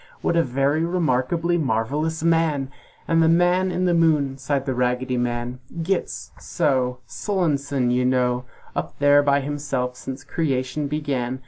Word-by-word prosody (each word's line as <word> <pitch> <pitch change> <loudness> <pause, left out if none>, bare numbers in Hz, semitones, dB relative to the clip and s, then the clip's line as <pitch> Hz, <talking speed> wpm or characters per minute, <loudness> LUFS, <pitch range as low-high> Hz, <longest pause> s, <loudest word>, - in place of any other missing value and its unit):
What - - +1
a 170 - +5
very 140 +2 +1
remarkably 170 0 +1
marvelous 145 +5 -1
man! 160 -5 +1 0.4
"And 165 0 +3
the 160 - +4
Man 175 +2 +3
in 180 +1 0
the 175 - +3
Moon," 155 -5 +2
sighed 135 0 -1
the 130 - -1
Raggedy 125 +1 0
Man, 120 0 -2 0.2
"Gits! 190 +2 -2
So! 125 -3 0
Sullonesome, 140 - -1
you 125 +1 +2
know! 125 -1 +1 0.3
Up - - -4
there 145 0 +5
by 140 0 +2
himself 135 -3 -3
since 130 +1 -7
creation 140 -2 -1
began! 135 -4 -2
140 Hz, 145 wpm, -23 LUFS, 125-160 Hz, 0.4 s, a